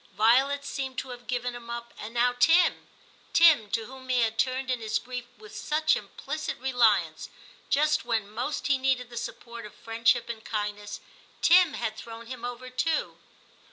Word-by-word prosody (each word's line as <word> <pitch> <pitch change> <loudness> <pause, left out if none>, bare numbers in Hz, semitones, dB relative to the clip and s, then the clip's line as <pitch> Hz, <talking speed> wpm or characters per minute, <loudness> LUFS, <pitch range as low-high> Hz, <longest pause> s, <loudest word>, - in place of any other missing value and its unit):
Violet 270 +6 +4
seemed 265 -2 -4
to 265 - -4
have 245 -1 -9
given 245 0 -2
him 240 -1 -10
up, 235 0 -6
and 215 - -6
now 245 +1 +3
Tim 330 +7 +4 0.2
— - - -30
Tim, 315 -11 +6
to 225 +2 -1
whom 260 +2 -12
he 250 -1 +3
had 225 0 0
turned 260 +1 0
in 250 - 0
his 220 -1 -1
grief 250 -1 -6
with 425 -1 -13
such 310 +1 +2
implicit 310 0 -5
reliance, 220 -11 +2 0.2
— - - -24
just 300 +2 +3
when 225 -4 -1
most 240 +8 -3
he 280 -2 +2
needed 260 -2 0
the - - -9
support 235 0 -6
of 210 -1 -11
friendship 230 +1 +1
and 225 -2 -6
kindness, 210 -1 -4 0.4
Tim 355 -2 +6
had 220 -2 -3
thrown 230 0 -9
him 245 0 -8
over 245 +1 -6
too. 315 +5 -1
245 Hz, 185 wpm, -27 LUFS, 230-265 Hz, 0.4 s, Tim